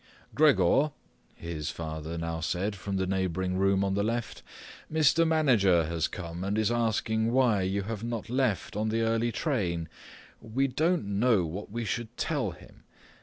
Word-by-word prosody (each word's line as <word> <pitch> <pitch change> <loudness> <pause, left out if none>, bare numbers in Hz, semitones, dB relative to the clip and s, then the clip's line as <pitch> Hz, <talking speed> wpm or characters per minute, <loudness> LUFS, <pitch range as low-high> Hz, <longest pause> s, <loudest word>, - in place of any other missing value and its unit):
"Gregor," 140 - +4 0.4
his 80 -2 -5
father 80 0 -5
now 85 0 -3
said 90 +5 -1
from 100 +1 -4
the 95 - 0
neighbouring 95 -1 -1
room 95 +1 +2
on 95 -1 0
the 100 - +1
left, 115 +1 -3 0.5
"Mr. 160 +1 +4
Manager 115 - +4
has 80 0 -1
come 85 -1 -6
and 100 +2 -1
is 110 +1 +2
asking 110 -1 0
why 120 -6 +3
you 95 +2 -1
have 110 +1 -5
not 115 -2 -4
left 125 -6 0
on 110 +1 0
the 115 +1 0
early 115 +1 +1
train. 90 - -1 0.5
We 130 +5 0
don't 160 - +1
know 110 -7 +3
what 90 +6 -6
we 115 +2 -4
should 110 +2 -4
tell - - -1
him. - - -14
105 Hz, 165 wpm, -28 LUFS, 90-120 Hz, 0.5 s, Gregor